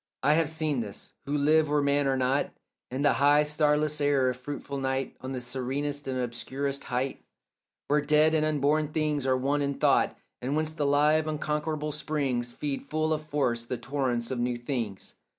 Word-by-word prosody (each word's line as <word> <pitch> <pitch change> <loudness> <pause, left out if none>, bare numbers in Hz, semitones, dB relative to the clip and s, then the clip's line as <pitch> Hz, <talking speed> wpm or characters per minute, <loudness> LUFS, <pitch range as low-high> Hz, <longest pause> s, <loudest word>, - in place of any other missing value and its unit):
I 150 - +5
have 160 -1 +2
seen 155 -4 0
this, 105 -4 -7
who 145 +1 0
live 155 +1 +3
where 150 0 +2
men 140 0 +2
are 135 -1 +1
not, 130 +2 +1 0.4
In 130 +3 -2
the 145 - +5
high 145 +1 +6
starless 150 0 +1
air 140 -3 +3
of 125 - -8
fruitful 140 +1 -5
night 135 0 -2
On 130 - -5
that 130 - -4
serenest 135 +3 -3
and 130 -1 -2
obscurest 135 +3 -3
height 130 +1 -2 0.6
Where 150 +1 +3
dead 150 +2 +4
and 155 -1 +3
unborn 150 0 +2
things 150 -2 -1
are 130 -1 +3
one 140 +3 0
in 140 0 -1
thought - - +2 0.2
And 130 +4 -1
whence 155 0 0
the 150 -2 -1
live 150 +2 +3
unconquerable 150 0 -2
springs 140 -5 -2
Feed 140 +2 -3
full 155 +2 -1
of 155 0 -3
force 125 -6 0
the 125 +1 -4
torrents 130 -4 -2
of 130 - -2
new 120 0 0
things. 120 -6 -4
145 Hz, 185 wpm, -28 LUFS, 130-150 Hz, 0.6 s, high